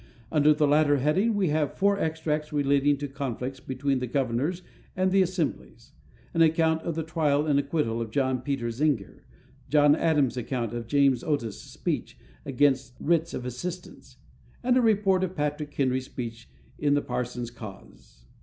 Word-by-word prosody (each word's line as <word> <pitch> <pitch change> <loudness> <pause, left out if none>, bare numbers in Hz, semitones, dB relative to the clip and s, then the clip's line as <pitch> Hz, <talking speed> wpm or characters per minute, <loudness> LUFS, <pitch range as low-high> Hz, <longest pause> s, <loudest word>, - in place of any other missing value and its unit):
Under 150 -1 +4
the 150 0 +3
latter 145 0 +4
heading 185 - +2
we 195 -5 +1
have 150 -1 0
four 200 0 +2
extracts 155 -2 -2
relating 140 0 +2
to 145 +1 -4
conflicts 135 -1 -4
between 135 +1 -1
the 125 - -3
governors 135 +8 -1 0.3
and 185 0 +1
the 195 0 +4
assemblies; 165 - -3 0.4
an 165 - +2
account 160 0 +3
of 170 -1 -3
the 160 - -2
trial 150 -2 +1
and 145 -2 +3
acquittal 140 -5 -1
of 115 - -4
John 130 +1 0
Peter 130 -3 -2
Zenger; 125 -4 -1 0.5
John 145 -1 +5
Adams' 145 -7 +1
account 120 -2 -3
of 120 -1 -5
James 140 -2 +3
Otis' 130 -9 -2
speech - - -4 0.3
against 130 -2 +1
writs 165 +1 +1
of 125 - -5
assistance; 175 +9 -7 0.5
and 250 0 +3
a 255 - +4
report 200 -4 +3
of 185 0 -3
Patrick 150 -1 -2
Henry's 130 -1 0
speech 115 -3 -7 0.3
in 145 -1 +2
the 145 - +1
Parson's 125 -1 -4
Cause. 100 - -13
145 Hz, 165 wpm, -27 LUFS, 125-160 Hz, 0.5 s, John